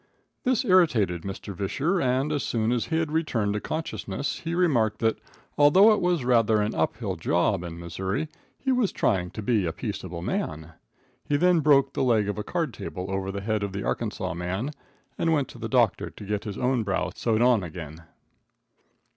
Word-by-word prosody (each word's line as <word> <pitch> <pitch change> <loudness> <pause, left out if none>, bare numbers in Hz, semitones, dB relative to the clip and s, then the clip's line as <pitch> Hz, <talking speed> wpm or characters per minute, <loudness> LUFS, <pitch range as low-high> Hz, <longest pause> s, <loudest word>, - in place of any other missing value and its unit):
This 255 0 +2
irritated 125 - +3
Mr. 95 +2 -6
Visscher, 140 - -1
and 130 +3 +1
as 145 -2 0
soon 115 0 0
as 120 -2 0
he 160 - 0
had 160 -2 -1
returned 125 -11 0
to 105 - -1
consciousness 155 -3 -3
he 170 +1 -3
remarked 120 - +2
that, 110 0 0 0.4
although 185 +10 +7
it 210 - 0
was 175 -7 +1
rather 115 -3 +4
an 105 +1 0
up 80 - 0
hill - - -3
job 90 +1 +1
in 85 -1 -6
Missouri, 95 - -3 0.3
he 265 - -1
was 250 -6 +2
trying 90 -2 0
to 110 - -7
be 105 -5 +1
a - - -1
peaceable 90 -3 -5
man. 80 -1 -3 0.5
He 145 - +1
then 180 +2 +4
broke 140 -2 +4
the - - -1
leg 110 -5 +3
of 105 +1 -3
a - - -2
card 170 +3 -2
table 95 0 -6
over 95 0 -2
the 100 0 -5
head 110 +1 -1
of 100 -2 -3
the 100 0 -3
Arkansas 100 -6 -2
man, 95 - -3 0.5
and 165 -1 +2
went 145 -4 +1
to 120 - -12
the 115 -1 -4
doctor 120 -4 +2
to 105 - -11
get 105 +2 -2
his 105 -2 -5
own 125 -1 +1
brow 100 -3 -1
sewed 115 0 +1
on 120 -4 +4
again. 80 -2 -8
115 Hz, 195 wpm, -26 LUFS, 95-150 Hz, 0.5 s, although